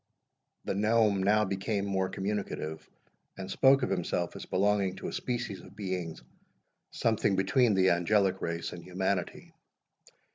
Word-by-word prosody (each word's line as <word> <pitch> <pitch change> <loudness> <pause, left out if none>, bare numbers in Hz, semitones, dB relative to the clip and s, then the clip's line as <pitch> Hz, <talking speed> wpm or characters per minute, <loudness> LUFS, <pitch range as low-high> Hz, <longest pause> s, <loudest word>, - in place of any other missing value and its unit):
The - - -1
gnome 105 -1 +2
now 105 +2 +3
became 100 +1 -2
more 95 -1 0
communicative, 95 -6 -4 0.5
and 95 -1 -6
spoke 135 0 +5
of - - -1
himself 90 -2 -1
as - - -8
belonging 100 0 +1
to - - -5
a - - -8
species 120 -5 -3
of - - -15
beings 90 -5 -4 0.7
something 110 -3 +1
between 105 +4 +3
the 95 -1 +4
angelic 95 +2 +2
race 85 0 -3
and 85 -1 -9
humanity. 95 0 -3
95 Hz, 140 wpm, -30 LUFS, 95-105 Hz, 0.7 s, spoke